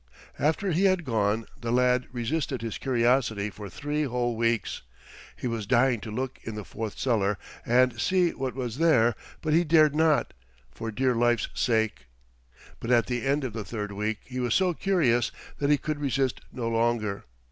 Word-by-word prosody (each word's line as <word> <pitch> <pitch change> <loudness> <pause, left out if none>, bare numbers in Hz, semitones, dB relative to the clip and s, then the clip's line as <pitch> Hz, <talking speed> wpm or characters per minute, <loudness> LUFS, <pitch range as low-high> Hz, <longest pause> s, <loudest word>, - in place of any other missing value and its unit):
After 160 +6 +1
he 175 +5 +2
had 185 -3 +2
gone 110 -2 0 0.2
the 115 -1 -2
lad 125 0 +2
resisted 130 +1 -2
his 115 - -4
curiosity 120 -4 +1
for 100 0 -9
three 145 - -2
whole 120 -2 -1
weeks. 115 0 0 0.5
He - - -8
was 115 -4 -2
dying 125 +1 +3
to 110 - -8
look 130 +4 -4
in 110 - -6
the 105 -2 -6
fourth 110 -2 -6
cellar 105 -6 +1 0.3
and 120 -1 +3
see 180 -2 +3
what 130 -2 -4
was 125 -1 -4
there, 120 -8 +4 0.3
but 155 -1 +1
he 170 +2 +5
dared 155 -2 +5
not, 155 -1 +2 0.4
for 115 - -5
dear 130 +3 +1
life's 120 -1 +2
sake. 110 - 0 0.7
But 115 - -6
at 120 -3 +4
the 120 0 -2
end 140 +2 +1
of 125 -5 -3
the 110 -1 -4
third 105 -1 -5
week 105 +2 -2
he 130 0 -5
was 125 -1 +1
so 185 -2 +3
curious 150 - +2 0.3
that 140 - +1
he 150 - +5
could 155 +1 -3
resist 135 -2 0
no 120 -2 -4
longer. 115 -3 0
120 Hz, 180 wpm, -27 LUFS, 115-140 Hz, 0.7 s, he